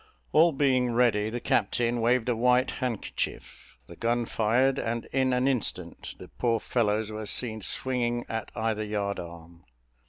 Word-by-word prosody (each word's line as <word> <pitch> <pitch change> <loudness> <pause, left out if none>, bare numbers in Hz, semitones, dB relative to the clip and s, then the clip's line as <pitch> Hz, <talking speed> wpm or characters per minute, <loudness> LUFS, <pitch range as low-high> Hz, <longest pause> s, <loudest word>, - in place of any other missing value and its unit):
All 165 +2 +5
being 130 -4 +2
ready, 115 -3 +2
the 120 +2 -4
captain 120 +1 0
waved 120 +1 +2
a 120 - +1
white 125 +2 +3
handkerchief, 120 - -5
the 85 - -12
gun 120 +4 0
fired, 120 +5 +2
and 115 +1 -2
in 130 -1 +2
an 125 +1 +1
instant 105 -9 -2
the - - -11
poor 115 -2 0
fellows 110 -2 0
were 110 0 -5
seen 110 0 -1
swinging 120 +1 -1
at 110 -1 -4
either 110 -1 -1
yard 100 -1 -2
arm. 85 0 -10
115 Hz, 155 wpm, -27 LUFS, 105-125 Hz, -, All